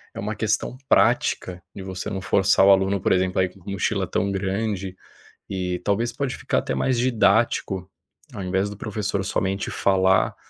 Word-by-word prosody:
é - - -6
uma 105 +2 -3
questão 105 +2 -1
prática 100 -4 +2
de 95 - -7
você 95 +2 -5
não 100 -2 -3
forçar 95 0 +3
o 100 - +7
aluno, 95 +1 +3
por - - +1
exemplo, 95 0 +1
a - - +4
ir - - -5
com 95 - -19
mochila 100 -2 -1
tão 100 - -1
grande, 95 -1 -2 0.5
e 90 -2 -2
talvez 115 +4 0
pode 140 -3 -3
ficar - - 0
até - - -3
mais 130 -2 +1
didático, 110 -5 +1 0.4
ao 100 - -5
invés 95 +2 0
do 105 - -9
professor 105 -2 -2
somente 95 0 -1
falar, 95 -1 +2
95 Hz, 175 wpm, -23 LUFS, 95-105 Hz, 0.5 s, o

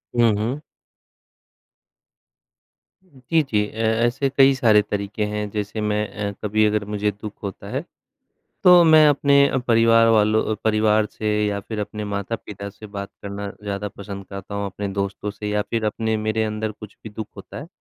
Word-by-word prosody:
हुँ, 120 -2 +5
हुँ। 125 +8 -2 2.4
जी, 160 -2 -1
जी। 105 -6 0
अ, - - -17
ऐसे 120 +5 +1
कई 135 0 +5
सारे 110 -4 +5
तरीके 105 +1 -3
हैं, 105 0 -3
जैसे 105 +1 -3
मैं 105 0 0 0.2
अ, - - -4
कभी 110 +1 +2
अगर 105 -1 +1
मुझे 105 0 -1
दुःख 105 +1 -8
होता 100 0 -6
है 135 +5 -3 0.8
तो 180 -1 +8
मैं 155 -1 +7
अपने 140 0 +4
अ, 135 - 0
परिवार 115 -1 +4
वालों 110 0 +3
परिवार 110 -1 +3
से 110 - -4 0.2
या 100 -1 -1
फिर 105 +2 -7
अपने 105 +1 -5
माता-पिता 100 0 -5
से 110 +1 -12
बात 100 -1 -7
करना 100 0 -5
ज़्यादा 100 0 -3
पसंद 100 -1 -9
करता 100 +1 -8
हूँ, 100 0 -2
अपने 100 +1 -5
दोस्तों 100 +1 -2
से 105 +1 -6
या 105 0 +1
फिर 115 -2 -1
अपने 110 +1 -1
मेरे 110 +1 0
अंदर 110 0 -3
कुछ 105 0 -12
भी 110 - -7
दुःख 105 0 -6
होता 100 - -10
है 150 - -9
105 Hz, 170 wpm, -22 LUFS, 105-115 Hz, 2.4 s, तो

